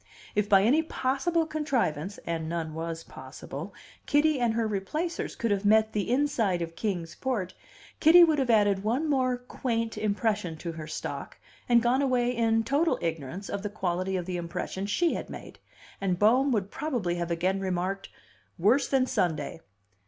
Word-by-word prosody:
If 210 Hz, 0 st, 0 dB
by 195 Hz, -1 st, +6 dB
any 270 Hz, +9 st, +4 dB
possible 320 Hz, +3 st, 0 dB
contrivance 245 Hz, -, -1 dB
(and 165 Hz, -1 st, -3 dB
none 165 Hz, -2 st, -3 dB
was 165 Hz, 0 st, -4 dB
possible) -, -, -8 dB, 0.4 s
Kitty 295 Hz, -1 st, +3 dB
and 235 Hz, -2 st, +1 dB
her 230 Hz, -1 st, +1 dB
Replacers 260 Hz, -, -3 dB
could 230 Hz, -2 st, -1 dB
have 200 Hz, 0 st, 0 dB
met 220 Hz, +1 st, +4 dB
the 205 Hz, 0 st, -1 dB
inside 235 Hz, -10 st, +1 dB
of 165 Hz, 0 st, -7 dB
Kings 175 Hz, -5 st, -3 dB
Port, 215 Hz, -9 st, -2 dB, 0.5 s
Kitty 345 Hz, +3 st, +8 dB
would 315 Hz, -3 st, +4 dB
have 260 Hz, -2 st, 0 dB
added 205 Hz, -3 st, +3 dB
one 250 Hz, +9 st, 0 dB
more 255 Hz, -3 st, +1 dB
"quaint" 230 Hz, -3 st, -3 dB
impression 210 Hz, -5 st, -1 dB
to 170 Hz, +2 st, -5 dB
her 160 Hz, -2 st, -8 dB
stock, -, -, -6 dB, 0.3 s
and 235 Hz, -1 st, +5 dB
gone 250 Hz, +3 st, +3 dB
away 250 Hz, -2 st, +1 dB
in 225 Hz, -1 st, +2 dB
total 285 Hz, +8 st, +1 dB
ignorance 165 Hz, +3 st, -4 dB
of 200 Hz, -, -3 dB
the 210 Hz, -, -3 dB
quality 185 Hz, -2 st, -2 dB
of 180 Hz, -, -3 dB
the 180 Hz, -1 st, -3 dB
impression 175 Hz, +3 st, -4 dB
she 335 Hz, +11 st, +1 dB
had -, -, -5 dB
made -, -, -10 dB, 0.4 s
and 185 Hz, -2 st, 0 dB
Bohm 250 Hz, +8 st, +4 dB
would 205 Hz, -4 st, -1 dB
probably 245 Hz, -, -2 dB
have 170 Hz, 0 st, -2 dB
again 180 Hz, +3 st, 0 dB
remarked, 190 Hz, +1 st, -2 dB, 0.5 s
"Worse 225 Hz, +11 st, +3 dB
than 265 Hz, -2 st, +2 dB
Sunday." 160 Hz, -, -1 dB
210 Hz, 170 wpm, -28 LUFS, 180-255 Hz, 0.5 s, Kitty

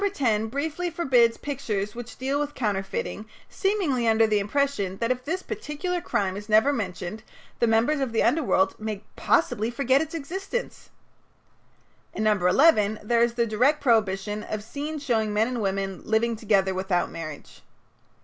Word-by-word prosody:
No. 400 Hz, -, +3 dB
10 225 Hz, -, 0 dB
briefly 310 Hz, +8 st, -2 dB
forbids 255 Hz, -9 st, +3 dB
pictures 210 Hz, -8 st, -3 dB
which 240 Hz, -1 st, -9 dB
deal 270 Hz, +2 st, -1 dB
with 295 Hz, 0 st, -3 dB
counterfeiting, 205 Hz, -1 st, -3 dB, 0.2 s
seemingly 350 Hz, -, 0 dB
under 225 Hz, 0 st, +5 dB
the 215 Hz, -1 st, +2 dB
impression 205 Hz, -4 st, -1 dB
that 230 Hz, +3 st, 0 dB
if 250 Hz, 0 st, -2 dB
this 370 Hz, +7 st, -3 dB
particular 360 Hz, -4 st, -4 dB
crime 190 Hz, -, -1 dB
is 205 Hz, +2 st, -8 dB
never 220 Hz, +7 st, +5 dB
mentioned 195 Hz, -3 st, -4 dB, 0.4 s
the 235 Hz, -, +3 dB
members 230 Hz, +7 st, +2 dB
of 265 Hz, -3 st, -1 dB
the 225 Hz, -, +1 dB
underworld 245 Hz, -11 st, +2 dB
may 215 Hz, -2 st, -4 dB
possibly 230 Hz, -8 st, +1 dB
forget 260 Hz, +2 st, +2 dB
its 320 Hz, -, -4 dB
existence. 385 Hz, -, -5 dB, 1.3 s
In 215 Hz, -, -1 dB
No. 215 Hz, -, +4 dB
11 210 Hz, -, +3 dB
there 235 Hz, +2 st, +2 dB
is 235 Hz, 0 st, +2 dB
the 235 Hz, -1 st, +2 dB
direct 250 Hz, +8 st, +2 dB
prohibition 210 Hz, -4 st, +1 dB
of 210 Hz, 0 st, -5 dB
"scenes 295 Hz, +5 st, -5 dB
showing 220 Hz, -5 st, 0 dB
men 220 Hz, +2 st, +3 dB
and 250 Hz, -2 st, -3 dB
women 195 Hz, -1 st, -2 dB
living 225 Hz, +1 st, +1 dB
together 195 Hz, -3 st, +1 dB
without 185 Hz, -1 st, -1 dB
marriage." 155 Hz, -3 st, -8 dB
230 Hz, 160 wpm, -25 LUFS, 210-280 Hz, 1.3 s, under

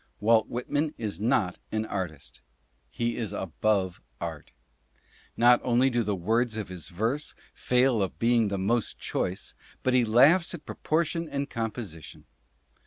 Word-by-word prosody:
Walt 110 Hz, +1 st, +4 dB
Whitman 145 Hz, +5 st, -2 dB
is 105 Hz, -4 st, -4 dB
not 110 Hz, -5 st, +1 dB
an 110 Hz, 0 st, -1 dB
artist; 90 Hz, -9 st, -5 dB, 0.5 s
he 120 Hz, 0 st, -2 dB
is 110 Hz, -5 st, -3 dB
above 95 Hz, 0 st, -1 dB, 0.2 s
art. 80 Hz, -3 st, -6 dB, 0.9 s
Not 120 Hz, +1 st, +6 dB
only 125 Hz, +2 st, +3 dB
do 120 Hz, 0 st, +1 dB
the 105 Hz, -2 st, -1 dB
words 110 Hz, +5 st, 0 dB
of 105 Hz, -4 st, -4 dB
his 90 Hz, -3 st, -8 dB
verse 115 Hz, -, -2 dB, 0.2 s
fail 125 Hz, -2 st, +2 dB
of 95 Hz, -, -2 dB
being 115 Hz, -1 st, +3 dB
the 100 Hz, 0 st, -2 dB
most 110 Hz, +4 st, 0 dB
choice, 90 Hz, +1 st, -2 dB, 0.3 s
but 130 Hz, -, +2 dB
he 125 Hz, -1 st, +5 dB
laughs 145 Hz, +11 st, +5 dB
at 155 Hz, -, -12 dB
proportion 165 Hz, +1 st, -1 dB
and 140 Hz, 0 st, -3 dB
composition. 110 Hz, -, -5 dB
115 Hz, 145 wpm, -27 LUFS, 100-125 Hz, 0.9 s, Not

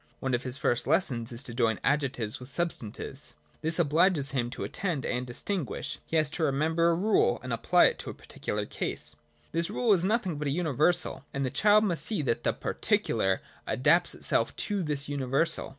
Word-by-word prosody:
One 130 Hz, -1 st, -2 dB
of 120 Hz, -, +1 dB
his 130 Hz, 0 st, -2 dB
first 120 Hz, -2 st, 0 dB
lessons 130 Hz, -8 st, +1 dB
is 120 Hz, +2 st, -2 dB
to 120 Hz, -, -5 dB
join 115 Hz, -3 st, +1 dB
adjectives 135 Hz, -6 st, 0 dB
with 125 Hz, +1 st, -10 dB
substantives. 140 Hz, -4 st, -3 dB, 0.3 s
This 160 Hz, +1 st, +4 dB
obliges 160 Hz, -2 st, +3 dB
him 120 Hz, -3 st, -1 dB
to -, -, -6 dB
attend 170 Hz, -9 st, -3 dB
and 125 Hz, +1 st, -2 dB
distinguish: 160 Hz, +5 st, -4 dB
he 165 Hz, -, 0 dB
has 155 Hz, -1 st, +2 dB
to 165 Hz, -, -2 dB
re 150 Hz, -, +3 dB
member 160 Hz, +4 st, +2 dB
a 170 Hz, -, +3 dB
rule 190 Hz, -, +2 dB
and 125 Hz, -2 st, -3 dB
apply 175 Hz, +10 st, +4 dB
it -, -, +1 dB
to -, -, -5 dB
the -, -, -5 dB
particular -, -, -4 dB
case. 75 Hz, 0 st, -2 dB, 0.4 s
This 165 Hz, +2 st, 0 dB
rule 225 Hz, +1 st, +2 dB
is 180 Hz, -3 st, +2 dB
nothing 195 Hz, -5 st, 0 dB
but 150 Hz, -, -2 dB
a -, -, 0 dB
universal: 155 Hz, -1 st, +1 dB
and 140 Hz, 0 st, 0 dB
the 130 Hz, -, -2 dB
child 210 Hz, 0 st, +4 dB
must 170 Hz, -8 st, 0 dB
see 190 Hz, -4 st, 0 dB
that 120 Hz, -4 st, 0 dB
the -, -, +2 dB
particular 95 Hz, -1 st, 0 dB, 0.2 s
adapts 170 Hz, +6 st, +3 dB
itself -, -, 0 dB
to 205 Hz, -2 st, -2 dB
this 150 Hz, -4 st, -1 dB
universal. 140 Hz, +2 st, +1 dB
150 Hz, 200 wpm, -28 LUFS, 125-170 Hz, 0.4 s, This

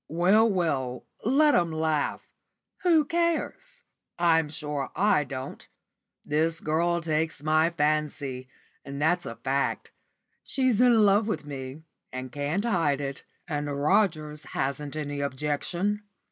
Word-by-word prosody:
"Well, 190 Hz, +8 st, +4 dB
well, 140 Hz, -, -1 dB, 0.2 s
let 290 Hz, +5 st, +4 dB
'em 170 Hz, -2 st, +2 dB
laugh. 155 Hz, -2 st, -1 dB, 0.5 s
Who 330 Hz, -4 st, +4 dB
cares? 340 Hz, -, -2 dB, 0.3 s
I'm 165 Hz, -3 st, +3 dB
sure 150 Hz, -2 st, -3 dB
I 200 Hz, -6 st, +3 dB
don't. 130 Hz, -1 st, -7 dB, 0.6 s
This 160 Hz, +2 st, +1 dB
girl 170 Hz, +3 st, 0 dB
takes 160 Hz, -2 st, -1 dB
my 155 Hz, +1 st, +3 dB
fancy, 150 Hz, -5 st, -1 dB, 0.3 s
and 140 Hz, +1 st, -7 dB
that's 175 Hz, +4 st, +1 dB
a 115 Hz, -, -6 dB
fact. 135 Hz, +3 st, -1 dB, 0.5 s
She's 255 Hz, -4 st, +1 dB
in 235 Hz, -4 st, +6 dB
love 205 Hz, +2 st, +4 dB
with 215 Hz, -, -2 dB
me, 135 Hz, +1 st, -7 dB, 0.3 s
and 130 Hz, 0 st, -6 dB
can't 145 Hz, -, -2 dB
hide 165 Hz, -11 st, +1 dB
it, 140 Hz, -1 st, -5 dB, 0.2 s
and 145 Hz, -3 st, -2 dB
Rogers 150 Hz, -2 st, +1 dB
hasn't 140 Hz, +2 st, -2 dB
any 145 Hz, -2 st, -3 dB
objection." 150 Hz, +9 st, -1 dB
155 Hz, 125 wpm, -27 LUFS, 145-190 Hz, 0.6 s, in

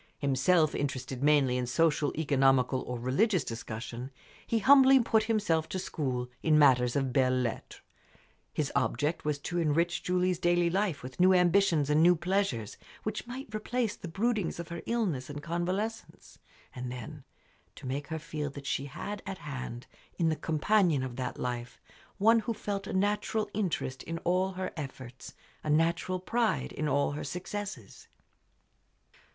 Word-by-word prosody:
Himself 150 Hz, +4 st, +2 dB
interested 130 Hz, -2 st, -3 dB
mainly 140 Hz, -4 st, +3 dB
in 125 Hz, -1 st, -2 dB
social, 150 Hz, +2 st, +2 dB
economical, 135 Hz, -3 st, +3 dB
or 125 Hz, -, -5 dB
religious 165 Hz, -, +2 dB
discussion, 115 Hz, +2 st, -6 dB, 0.4 s
he 230 Hz, -, +1 dB
humbly 270 Hz, +3 st, +7 dB
put 225 Hz, -2 st, +2 dB
himself 200 Hz, -8 st, +1 dB
to -, -, -3 dB
school 130 Hz, -8 st, -2 dB
in 155 Hz, -1 st, +4 dB
matters 125 Hz, -5 st, +5 dB
of 135 Hz, -3 st, 0 dB
belles 130 Hz, -1 st, +2 dB
lettres. 115 Hz, -, -5 dB, 0.7 s
His -, -, -2 dB
object 150 Hz, +2 st, 0 dB
was 150 Hz, -1 st, 0 dB
to 175 Hz, +3 st, -2 dB
enrich 170 Hz, +3 st, +1 dB
Julie's 180 Hz, -1 st, +1 dB
daily 175 Hz, 0 st, +2 dB
life 185 Hz, -7 st, 0 dB
with 125 Hz, +4 st, -9 dB
new 185 Hz, +1 st, +6 dB
ambitions 180 Hz, -4 st, +3 dB
and 150 Hz, +1 st, +4 dB
new 175 Hz, +2 st, +6 dB
pleasures, 170 Hz, -, -1 dB, 0.3 s
which 215 Hz, +2 st, -4 dB
might 250 Hz, -2 st, -8 dB
replace 225 Hz, +1 st, -1 dB
the -, -, -8 dB
broodings 200 Hz, 0 st, -1 dB
of 170 Hz, -, -6 dB
her 170 Hz, 0 st, -5 dB
illness 190 Hz, -, -1 dB
and 145 Hz, 0 st, -7 dB
convalescence, 185 Hz, +7 st, -4 dB, 0.3 s
and 125 Hz, 0 st, -5 dB
then, 125 Hz, -3 st, -8 dB, 0.5 s
to 145 Hz, -, -11 dB
make 135 Hz, +2 st, -3 dB
her 160 Hz, -, -3 dB
feel 150 Hz, -2 st, -4 dB
that 140 Hz, 0 st, -10 dB
she 135 Hz, +1 st, -1 dB
had 200 Hz, +9 st, -6 dB
at 195 Hz, -1 st, -4 dB
hand, 130 Hz, -5 st, -6 dB, 0.3 s
in 165 Hz, -3 st, +2 dB
the 155 Hz, -, +1 dB
companion 165 Hz, -1 st, +2 dB
of 130 Hz, -2 st, -5 dB
that 130 Hz, -1 st, -3 dB
life, 120 Hz, -1 st, -4 dB, 0.4 s
one 225 Hz, +3 st, +5 dB
who 225 Hz, +1 st, -3 dB
felt 200 Hz, -1 st, -4 dB
a -, -, -4 dB
natural 210 Hz, +2 st, 0 dB
interest 175 Hz, -10 st, -2 dB
in 165 Hz, +1 st, -5 dB
all 185 Hz, +2 st, +1 dB
her 185 Hz, 0 st, -4 dB
efforts, 130 Hz, -4 st, -8 dB, 0.3 s
a 155 Hz, -, -4 dB
natural 170 Hz, +4 st, +1 dB
pride 225 Hz, +2 st, 0 dB
in 155 Hz, -, -2 dB
all 140 Hz, 0 st, +1 dB
her 145 Hz, -, -5 dB
successes. 180 Hz, -, -6 dB
160 Hz, 160 wpm, -30 LUFS, 135-195 Hz, 0.7 s, humbly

